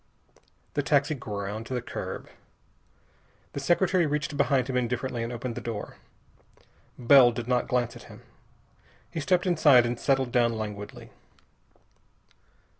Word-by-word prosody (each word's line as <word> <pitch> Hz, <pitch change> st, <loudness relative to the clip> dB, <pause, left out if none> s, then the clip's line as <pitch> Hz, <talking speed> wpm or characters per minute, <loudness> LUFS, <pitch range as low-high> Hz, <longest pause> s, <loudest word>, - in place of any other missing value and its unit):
The -, -, 0 dB
taxi 145 Hz, +1 st, +2 dB
ground 105 Hz, -3 st, -5 dB
to 130 Hz, -, -4 dB
the 125 Hz, -, -2 dB
curb. -, -, -6 dB, 1.3 s
The -, -, -4 dB
secretary 175 Hz, +3 st, +2 dB
reached 145 Hz, 0 st, -2 dB
behind 140 Hz, -3 st, +2 dB
him 130 Hz, -, -3 dB
indifferently 125 Hz, 0 st, -1 dB
and 115 Hz, +1 st, -3 dB
opened 120 Hz, 0 st, -4 dB
the -, -, -6 dB
door. 110 Hz, -3 st, -6 dB, 1.0 s
Bell 125 Hz, 0 st, +6 dB
did 115 Hz, 0 st, -6 dB
not 125 Hz, -1 st, +1 dB
glance 120 Hz, -1 st, 0 dB
at -, -, -12 dB
him. -, -, -13 dB, 0.9 s
He -, -, -4 dB
stepped 180 Hz, +5 st, +1 dB
inside 150 Hz, -8 st, +5 dB
and 120 Hz, 0 st, -3 dB
settled 135 Hz, -2 st, +1 dB
down 120 Hz, -2 st, +2 dB
languidly. 105 Hz, -2 st, -7 dB
125 Hz, 135 wpm, -27 LUFS, 115-140 Hz, 1.3 s, Bell